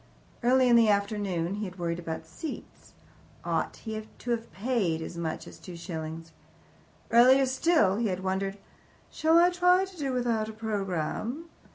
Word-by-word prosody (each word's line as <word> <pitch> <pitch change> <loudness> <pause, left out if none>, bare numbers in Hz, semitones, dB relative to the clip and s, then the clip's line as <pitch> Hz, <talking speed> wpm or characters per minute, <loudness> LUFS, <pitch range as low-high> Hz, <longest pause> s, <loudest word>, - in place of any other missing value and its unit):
Earlier 255 +1 +4
in - - +7
the 230 -2 +5
afternoon 200 -4 0
he 210 +1 -3
had 185 -1 -8
worried 170 -1 -2
about 160 -2 -5
seats. 225 - -9 0.5
Ought - - -1
he 220 -1 -5 0.2
to 245 - -4
have 230 -1 -2
paid 200 -7 0
as 165 - -6
much 165 -2 -4
as - - -12
two 180 -2 -9
shillings? 165 -1 -6 0.8
Earlier 255 +3 +7
still 260 - +2
he 230 0 +1
had 185 -1 -3
wondered, 195 +1 -1 0.5
"Shall 320 +1 +3
I 350 +1 +6
try 360 +1 +4
to 380 -1 -14
do 280 -4 -2
without 235 -4 0
a - - -7
programme?" 215 - -3
215 Hz, 165 wpm, -28 LUFS, 180-255 Hz, 0.8 s, in